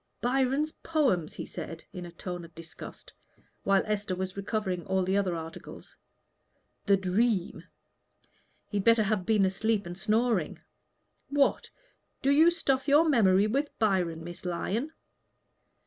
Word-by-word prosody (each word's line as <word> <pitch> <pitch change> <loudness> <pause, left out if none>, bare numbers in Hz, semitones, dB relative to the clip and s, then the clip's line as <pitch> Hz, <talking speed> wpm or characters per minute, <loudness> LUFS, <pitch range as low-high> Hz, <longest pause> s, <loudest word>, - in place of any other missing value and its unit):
"Byron's 270 +4 +1
Poems!" 260 - +1
he - - -5
said, 165 0 -7
in 180 -1 -6
a - - -11
tone 175 0 -6
of 165 -1 -14
disgust, 165 -1 -10 0.5
while 195 -1 +3
Esther 205 -3 -2
was 185 +1 -4
recovering 200 -3 -2
all 190 0 +1
the 190 +2 0
other 190 -3 +1
articles. 160 0 -9 0.9
"'The 200 -1 +5
Dream' 190 +1 0 1.1
he'd 205 -2 -1
better 230 0 +5
have 205 -3 -1
been 210 -3 +4
asleep 205 +2 0
and 175 0 -6
snoring. 215 -2 0 0.7
What! 280 0 +1 0.5
do 275 - +3
you 315 +4 +6
stuff 275 -5 0
your 295 +3 +5
memory 205 -8 +4
with 275 +7 -1
Byron, 180 -7 0
Miss 175 +1 -9
Lyon?" 200 - -2
200 Hz, 135 wpm, -29 LUFS, 180-245 Hz, 1.1 s, you